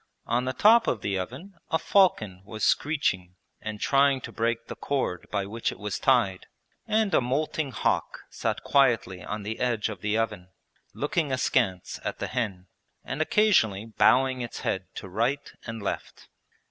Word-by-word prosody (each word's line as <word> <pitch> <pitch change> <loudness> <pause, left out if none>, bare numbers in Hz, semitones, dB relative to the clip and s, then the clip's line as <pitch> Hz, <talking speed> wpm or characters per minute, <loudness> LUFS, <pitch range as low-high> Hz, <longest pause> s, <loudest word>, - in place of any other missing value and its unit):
On 120 +2 0
the 130 - -1
top 225 - +5
of 110 - 0
the 100 -2 -1
oven 130 - -7 0.2
a 160 - +2
falcon 110 - +2
was 110 +2 -7
screeching 95 - +1 0.3
and 105 -1 -5
trying 140 +1 +3
to - - -7
break 115 0 -1
the - - -7
cord 130 -11 -2
by 100 -2 -1
which 115 +3 -2
it - - -10
was 105 -1 -4
tied, 120 -9 +2 0.4
and 215 -3 +1
a - - +5
moulting 145 +4 -1
hawk 125 - -1
sat - - -2
quietly 120 -9 +2
on 105 0 -5
the 110 +2 -4
edge 120 -4 0
of 100 -4 -7
the 105 +1 0
oven, 105 -5 -2 0.5
looking 150 0 -1
askance 115 -7 0
at - - -3
the - - -3
hen 105 -7 -3 0.4
and 135 +4 -4
occasionally 155 - +3
bowing 130 +3 +3
its 120 - -6
head 95 -1 -2
to - - -7
right 115 +9 -1 0.2
and 115 -2 -6
left. - - -5
115 Hz, 170 wpm, -27 LUFS, 100-140 Hz, 0.5 s, top